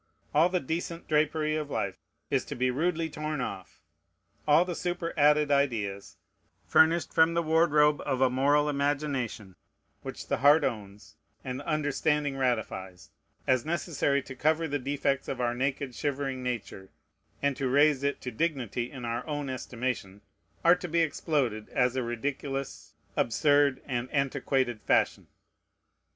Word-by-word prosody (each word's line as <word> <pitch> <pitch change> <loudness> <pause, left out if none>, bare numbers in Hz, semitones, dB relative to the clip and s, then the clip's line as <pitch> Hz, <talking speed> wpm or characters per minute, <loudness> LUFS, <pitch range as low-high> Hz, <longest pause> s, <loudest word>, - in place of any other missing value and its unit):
All 160 +4 +5
the 180 0 +1
decent 165 +3 -4
drapery 155 0 +1
of 150 -2 -3
life 100 -8 -3 0.3
is - - +2
to - - -6
be 125 +1 +1
rudely 165 +4 0
torn 155 -1 -4
off. 95 -10 -6 0.7
All 155 +4 +5
the 180 - -3
superadded 155 -4 +1
ideas, 110 -9 0 0.5
furnished 165 +1 +3
from 165 +1 +4
the 170 - +2
wardrobe 155 -2 +3
of 130 - -1
a 130 - +5
moral 140 +4 +2
imagination, 140 -8 -2 0.5
which - - -7
the - - 0
heart 145 +4 +5
owns 105 -6 -5 0.3
and 130 0 -4
the 145 - -10
understanding 150 -1 0
ratifies, 95 -8 -3 0.3
as 130 -2 +2
necessary 155 -4 0
to 130 - -9
cover 155 +4 +1
the 145 0 -2
defects 140 0 -1
of 130 - -4
our 120 -1 +1
naked, 135 +1 -2
shivering 135 -1 -2
nature, 115 -6 -5 0.5
and 140 -1 0
to 135 -2 -1
raise 145 +1 +4
it 140 0 -1
to 125 - -5
dignity 125 - -2
in 125 -4 -8
our 120 +1 -2
own 145 -3 -3
estimation, 120 -6 -4 0.4
are 170 - +8
to 180 - -6
be 170 0 +1
exploded, 140 -9 -1
as 125 0 +1
a 130 - 0
ridiculous, 135 +3 -4 0.2
absurd, 145 +3 +3
and 125 -2 -3
antiquated 135 -4 0
fashion. - - +1
140 Hz, 145 wpm, -28 LUFS, 125-155 Hz, 0.7 s, are